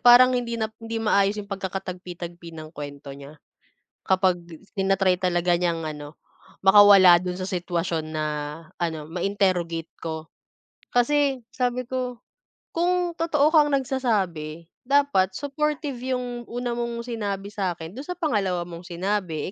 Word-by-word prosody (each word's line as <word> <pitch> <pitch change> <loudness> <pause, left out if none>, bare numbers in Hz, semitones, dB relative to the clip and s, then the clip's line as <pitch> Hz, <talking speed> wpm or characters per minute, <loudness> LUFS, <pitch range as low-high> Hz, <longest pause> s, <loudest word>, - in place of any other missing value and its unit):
parang 250 +1 +8
hindi 240 -2 -1
na 220 -1 -2
hindi 225 0 -5
maayos 210 -2 +2
'yung 210 - -4
pagkakatagpi-tagpi 180 -3 -6
ng 155 0 -9
kuwento 145 -2 -8
niya. 140 +2 -11 0.7
Kapag 185 -1 +3 0.4
tina-try 195 -1 +3
talaga 175 -1 +2
niyang 170 -2 0
ano 150 -1 -6 0.5
makawala 195 -2 +8
do'n 180 +1 -3
sa 185 - -3
sitwasyon 175 -3 -2
na 155 -1 -1 0.5
ano 160 -3 -3
ma-interrogate 175 -3 0
ko. 160 -1 -6 0.6
Kasi 270 0 +2
sabi 250 0 -1
ko, 250 0 -3 0.6
kung 355 +1 +1
totoo 310 -2 +3
kang 305 -3 +6
nagsasabi 190 - -1 0.2
dapat 275 -10 +3
supportive 290 0 -2 0.2
'yung 245 -1 -5
una 245 0 -3
mong 235 0 -3
sinabi 205 -4 -4
sa'kin 175 -5 -3
do'n 270 - -8
sa 360 - -3
pangalawa 195 - 0
mong 175 0 -10
sinabi, 180 -2 -2
195 Hz, 130 wpm, -25 LUFS, 175-245 Hz, 0.7 s, parang